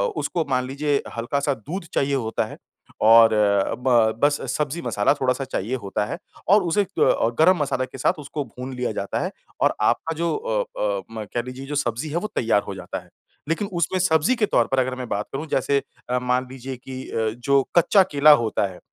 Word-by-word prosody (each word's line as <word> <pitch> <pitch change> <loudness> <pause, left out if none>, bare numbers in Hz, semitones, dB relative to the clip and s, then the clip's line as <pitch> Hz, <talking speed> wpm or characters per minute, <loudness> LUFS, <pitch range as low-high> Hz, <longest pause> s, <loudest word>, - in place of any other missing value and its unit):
उसको 165 -3 -1
मान 125 -1 +1
लीजिए 140 +1 0 0.2
हल्का-सा 140 +5 0
दूध 165 - -6
चाहिए 140 0 +1
होता 115 -4 -1
है - - -10 0.4
और 115 +1 +8 0.5
ब 130 - -1 0.3
बस 145 0 +4 0.2
सब्ज़ी 150 +3 -2
मसाला 110 -4 +2
थोड़ा-सा 130 -1 0
चाहिए 120 -1 -3
होता 100 -4 -2
है 105 - -5 0.3
और 205 0 +6
उसे 175 +4 +2
अ, - - -7 0.5
गरम 180 +3 +6
मसाला 130 -2 0
के 135 - -11
साथ - - +2
उसको 145 +1 -4
भून 125 +3 -8
लिया 125 -2 -2
जाता 100 -2 -3
है। - - -3 0.3
और - - +4
आपका 120 +9 +1
जो 170 +1 0
अ, - - -3
अ, - - 0
म 110 -1 -5
कह 120 - 0
लीजिए 125 +2 -8
जो 145 - -4
सब्ज़ी 125 +2 -1
है 160 - -2
वो 210 - -2
तैयार 110 -3 +2
हो 100 - -5
जाता 95 - -6
है। - - -23 0.4
लेकिन 185 +5 0
उसमें 175 +2 0
सब्ज़ी 175 - +3
के 220 -3 +2
तौर 120 - +2
पर 135 - +1
अगर 130 0 0
मैं 125 -2 -6
बात 105 +1 -1
करूँ 150 +4 -3
जैसे 140 0 +1 0.3
अ, 125 0 +1
मान 125 +1 0
लीजिए 130 0 -6
कि 130 +1 -8
अ, 110 -1 0
जो 140 +2 +3 0.2
कच्चा 190 +3 +6
केला 145 +1 +6
होता 110 -2 0
है, 90 -2 -11
135 Hz, 210 wpm, -23 LUFS, 120-160 Hz, 0.5 s, और